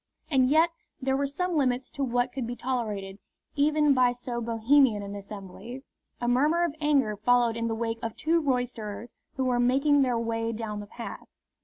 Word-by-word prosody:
And 260 -2 +4
yet 320 +3 +4 0.3
there 265 0 0
were 280 +1 0
some 355 +5 -2
limits 255 -3 0
to 285 -2 -3
what 245 0 0
could 260 -4 -3
be 245 - -4
tolerated 210 -6 -3 0.4
even 295 0 +3
by 250 -2 +3
so 245 -1 -5
Bohemian 230 0 +3
an 200 0 -6
assembly. 205 +5 -9 0.4
A 240 - -2
murmur 295 +8 +3
of 340 -4 0
anger 275 -8 +2
followed 235 +2 +2
in 230 0 -1
the 225 - -1
wake 225 0 -2
of 225 -2 -4
two 330 +1 +1
roisterers 245 -5 -3 0.2
who 265 - -1
were 250 -1 +1
making 275 +4 +3
their 250 -3 +2
way 230 0 -2
down 215 -2 -4
the 205 - -8
path. 235 +3 -8
245 Hz, 185 wpm, -27 LUFS, 225-275 Hz, 0.4 s, And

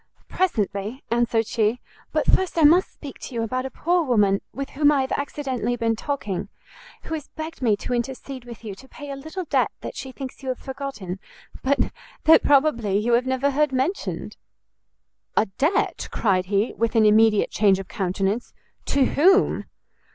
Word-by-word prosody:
"Presently," 215 - -1
answered 235 -1 +2
she; 220 +2 0 0.3
"but - - +1
first 375 -2 +2
I 325 - +4
must 335 +5 +5
speak 285 -3 -10
to 250 - -8
you 230 - 0
about 255 +3 -2
a - - -8
poor 350 +6 +1
woman 205 -7 +3
with 275 +3 -5
whom 290 +1 +4
I 285 -2 +3
have 265 - -3
accidentally 265 -4 -2
been 230 -1 0
talking, 220 -7 -3 0.5
who - - -6
has 310 -3 -4
begged 315 -1 -8
me 220 -5 +3
to 250 - -4
intercede 260 +1 -4
with 235 -1 -11
you 210 -3 -5
to 260 +7 -14
pay 290 +1 -9
a - - -4
little 315 +7 -6
debt - - +2
that - - -6
she 265 - -6
thinks 260 0 -8
you 265 - -5
have 255 - -1
forgotten, 265 -9 -6 0.4
but 275 +1 +1 0.3
that 320 - +7
probably 270 -9 +3
you 230 +3 +1
have 245 +2 +3
never 260 +2 +1
heard 295 +1 +2
mentioned." 270 +9 -2 1.0
"A - - +5
debt?" 300 - 0
cried 185 -4 +1
he, 205 +3 +1
with 230 +1 -1
an 220 -1 +5
immediate 215 0 +4
change 200 -2 +4
of 195 -1 -7
countenance, 195 +4 -2 0.3
"to 275 -1 +2
whom?" 380 +10 +3
255 Hz, 180 wpm, -24 LUFS, 215-285 Hz, 1.0 s, that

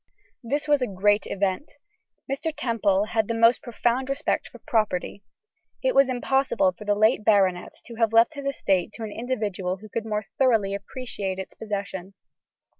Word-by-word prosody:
This 285 +5 -1
was 290 -2 +3
a 250 - +1
great 205 +2 +2
event. 195 +7 -2 0.5
Mr. 275 +4 -2
Temple 210 -8 +1
had 220 -1 0
the 230 - -1
most 230 +2 +4
profound 245 +2 -1
respect 275 +2 -1
for - - -13
property. 205 -3 -1 0.6
It - - +2
was 275 -1 +5
impossible 270 +3 +1
for 210 - -11
the 205 0 +2
late 215 +1 +3
baronet 190 -4 +2
to 235 - -9
have 225 -2 +2
left 230 +6 +5
his 280 -2 -5
estate 195 -8 0
to 230 - -7
an 215 - -5
individual 205 -6 -2
who 215 +3 -13
could 225 +2 -4
more 210 -1 -2
thoroughly 225 -7 +3
appreciate 200 -2 -5
its 190 - -7
possession. 200 -3 -5
220 Hz, 170 wpm, -25 LUFS, 200-255 Hz, 0.6 s, was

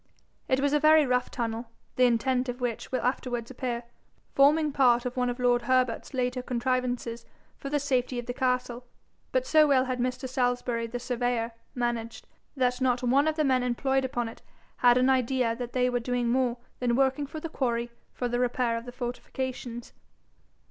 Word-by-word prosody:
It 260 - +2
was 285 +1 +1
a 295 - +4
very 310 0 +6
rough 250 -1 +1
tunnel, 230 -1 -3 0.3
the 255 - +5
intent 250 +2 +1
of 245 +1 -4
which 245 -3 -3
will 255 - -1
afterwards 245 -1 -2
appear, 245 -2 -3 0.5
forming 300 +2 +4
part 245 -3 +3
of 250 - -3
one 250 -1 +1
of 245 - -3
lord 245 -1 +2
Herbert's 255 -1 +1
later 250 0 -1
contrivances 245 -1 -2 0.4
for 275 - -5
the 295 +1 +1
safety 255 -3 0
of 240 - -4
the 245 - -4
castle; 250 -1 -1 0.5
but - - +1
so 310 -10 +5
well 265 -2 +4
had 255 -1 -3
Mr. 255 +1 -2
Salisbury, 245 -2 -1
the 240 +2 -4
surveyor, 245 -1 -1 0.2
managed, 235 -2 -3 0.3
that 250 0 +1
not 255 -1 +1
one 270 +5 +3
of 315 - +1
the 310 - +1
men 260 -2 +3
employed 265 +2 0
upon 245 -2 -2
it 225 - -10 0.4
had 245 0 +5
an 255 +1 +3
idea 255 -2 +2
that 245 0 -6
they 250 -1 +2
were 245 -1 0
doing 245 0 -1
more 250 -1 +1 0.2
than 240 -1 +1
working 270 +2 +2
the 310 +3 -6
quarry 240 -6 -2 0.2
for 245 - -3
the 240 0 -1
repair 245 -1 +1
of 230 - -7
the - - -6
fortifications. 245 -1 -5
250 Hz, 185 wpm, -28 LUFS, 240-260 Hz, 0.5 s, very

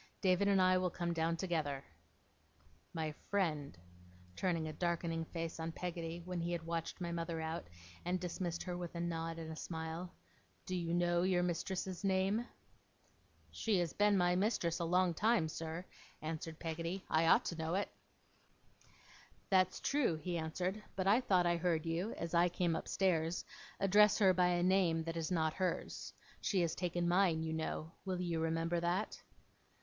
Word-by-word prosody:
'David 190 +1 +3
and 200 -1 +4
I 185 0 +5
will 185 0 +1
come 170 0 -2
down, 165 0 0
together. 155 -7 -1 1.1
My 160 -2 -2 0.2
friend,' 155 - 0 0.6
turning 165 - 0
a 155 - -5
darkening 170 -1 -1
face 165 0 -5
on 160 0 -2
Peggotty, 170 -1 -4
when 180 -1 -3
he 170 +1 -2
had 165 -1 -3
watched 165 +1 -3
my 175 -1 -3
mother 165 -1 -2
out, 160 - -3 0.4
and 180 +1 0
dismissed 175 -1 -3
her 180 -1 -3
with 175 -1 -5
a - - -3
nod 165 -1 -2
and 160 -1 -6
a - - -5
smile; 160 +2 -5 0.5
'do 185 - -2
you 170 -2 -2
know 175 0 +2
your 180 -1 +2
mistress's 180 +2 -2
name?' 195 +4 +1 1.0
'She 215 -4 +1
has 175 -2 0
been 205 -1 +4
my 180 -1 +3
mistress 180 -4 +1
a 170 - 0
long 180 +1 +3
time, 215 -1 +3
sir,' 160 +2 -5 0.4
answered 160 0 -4
Peggotty, 165 +3 -4
'I 160 +1 +3
ought - - +6
to 170 - -2
know 160 +2 -1
it.' 200 - -1 1.6
'That's 185 -1 +4
true,' 275 - +2
he 175 +2 -3
answered. 180 +5 -2
'But 185 - -1
I 210 +6 +5
thought 185 -7 +3
I 175 0 +3
heard 170 -2 +1
you, 170 +7 -1
as 170 0 -5
I 175 +1 +5
came 175 -1 0
upstairs, 170 -3 0 0.3
address 205 +1 +6
her 190 -3 +6
by 180 0 +4
a 175 0 +2
name 180 -3 +3
that 165 +1 -4
is 165 -1 -2
not 160 -3 +1
hers. 185 -1 -2 0.3
She 190 -3 +2
has 170 -2 +1
taken 175 -1 -1
mine, 175 -3 +3
you 160 0 -2
know. 160 0 -3
Will 185 -2 -2
you 170 -2 -1
remember 165 +1 0
that? 175 +5 -1
175 Hz, 175 wpm, -36 LUFS, 165-185 Hz, 1.6 s, ought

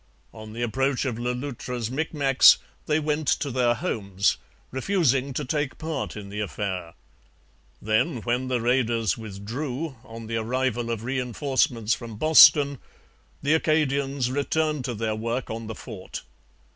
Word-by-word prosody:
On 110 -1 -10
the 120 +1 -3
approach 135 +3 0
of 120 -4 -2
Le 120 +1 -1
Loutre's 125 -3 -4
Micmacs 140 -2 +5 0.3
they 150 0 +2
went 150 -1 -1
to 140 - +1
their 120 -1 +2
homes, 100 - 0 0.3
refusing 135 -3 +1
to 145 +2 -3
take 145 0 -2
part 155 -7 -4
in 100 -1 -8
the 105 +1 -5
affair. 95 -5 -4 0.8
Then 110 +7 +1
when 125 +2 0
the 125 -2 0
raiders 115 -5 +1
withdrew, 125 +8 -5
on 115 -2 -9
the 115 +1 -2
arrival 120 0 -1
of 115 -2 -3
reinforcements 125 -2 0
from 115 -3 -6
Boston, 145 -1 +7 0.6
the 145 +2 +3
Acadians 140 -5 +1
returned 150 0 0
to 120 - -3
their 110 0 -1
work 115 +3 -3
on 115 0 -5
the 110 - -5
fort. 105 -5 -8
125 Hz, 145 wpm, -25 LUFS, 115-140 Hz, 0.8 s, Boston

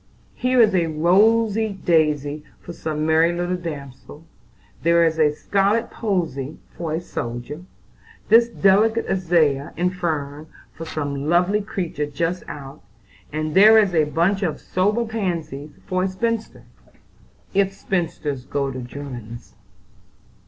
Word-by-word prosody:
Here 255 0 +1
is 215 -3 +5
a 175 -3 +2
rosy 205 +6 +2
daisy 150 -3 +1 0.2
for 175 - -9
some 155 -2 -3
merry 160 +2 +4
little 175 +1 -2
damsel; 150 -3 -8 0.6
there 170 +1 +4
is 160 0 0
a 150 -1 +4
scarlet 200 +8 0
posy 165 - -2 0.2
for 165 -3 -4
a - - -1
soldier; 120 -1 -6 0.7
this 235 +1 +6
delicate 220 +2 +3
azalea 165 -7 +1
and 180 +2 0
fern 155 -4 -3 0.3
for 165 - -8
some 145 -2 -3
lovely 180 +5 +3
creature 175 -7 -3
just 165 +5 -2
out; 140 -2 -9 0.5
and 155 0 -3
there 215 +4 +8
is 205 -4 +3
a 160 -2 +3
bunch 170 +7 +1
of 175 -6 -1
sober 210 +6 0
pansies 170 -10 -4 0.2
for 185 0 -1
a 190 - +1
spinster, 225 +4 -3 0.9
if 195 0 +2
spinsters 165 -8 -3
go 140 0 -2
to 130 - -6
'Germans. 120 -3 -9
170 Hz, 130 wpm, -22 LUFS, 150-195 Hz, 0.9 s, there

